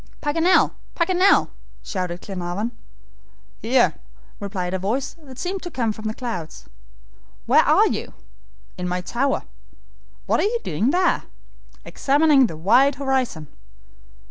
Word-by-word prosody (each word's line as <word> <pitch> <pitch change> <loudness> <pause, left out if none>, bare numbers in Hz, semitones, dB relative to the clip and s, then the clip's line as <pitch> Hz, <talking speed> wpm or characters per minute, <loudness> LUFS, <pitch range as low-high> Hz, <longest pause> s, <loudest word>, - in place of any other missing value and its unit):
"Paganel, 330 +5 +3 0.2
Paganel!" 365 +2 +3 0.3
shouted 180 -3 -4
Glenarvan. 190 +4 -4 0.9
"Here," - - +3 0.5
replied 190 -3 -4
a 190 - -1
voice 250 +9 -2
that 265 -4 -13
seemed 370 +5 -3
to 350 - -6
come 235 -8 -1
from 215 +1 -10
the 215 0 -2
clouds. 185 -11 -6 0.8
"Where - - +5
are - - +4
you?" - - -4 0.6
"In 180 - -2
my 180 0 -2
tower." 260 +9 -1 0.8
"What - - +1
are - - +2
you 440 +4 +1
doing 190 - 0
there?" 360 +4 +1 0.6
"Examining 285 -2 +3
the 160 - -8
wide 245 - +4
horizon." 265 - -1
245 Hz, 125 wpm, -22 LUFS, 185-290 Hz, 0.9 s, Where